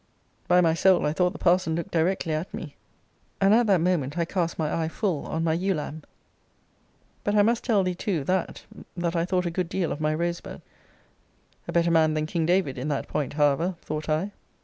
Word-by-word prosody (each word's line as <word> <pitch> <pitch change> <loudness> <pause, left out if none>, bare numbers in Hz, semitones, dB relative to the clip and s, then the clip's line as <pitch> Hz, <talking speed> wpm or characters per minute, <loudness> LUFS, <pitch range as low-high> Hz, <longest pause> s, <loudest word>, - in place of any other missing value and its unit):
By 180 0 +5
my 165 -2 +3
soul 185 +2 +3
I 150 - +1
thought 180 +2 +2
the - - -9
parson 175 -2 +2
looked 170 -1 -4
directly 170 0 0
at 155 +4 -3
me; 145 -5 -8 0.6
and 195 +1 +4
at 235 +1 +4
that 190 -5 +4
moment 165 -4 0
I 170 - +1
cast 170 -1 -2
my 155 -2 -1
eye 160 -1 -1
full 170 -2 -2
on 160 - -2
my 160 -1 +2
ewe 185 +3 0
lamb. 150 +1 -5 1.2
But 205 - 0
I 205 - +6
must 230 +2 +1
tell 210 -5 +2
thee 185 0 -1
too, 175 -4 -2
that, 185 +4 -2 0.3
that 175 0 -1
I 165 0 +1
thought 180 0 0
a 170 - -1
good 175 0 -2
deal 185 -3 -1
of 150 - -4
my 155 0 +1
Rosebud. 170 +1 -4 1.0
A - - -3
better 170 0 +2
man 160 -1 +3
than 155 0 0
King 160 0 -1
David, 175 -8 +1
in 130 - -3
that 145 -2 -2
point, 145 -3 -2
however, 150 +5 +2
thought 155 0 -4
I! 160 +7 0
170 Hz, 215 wpm, -26 LUFS, 155-185 Hz, 1.2 s, I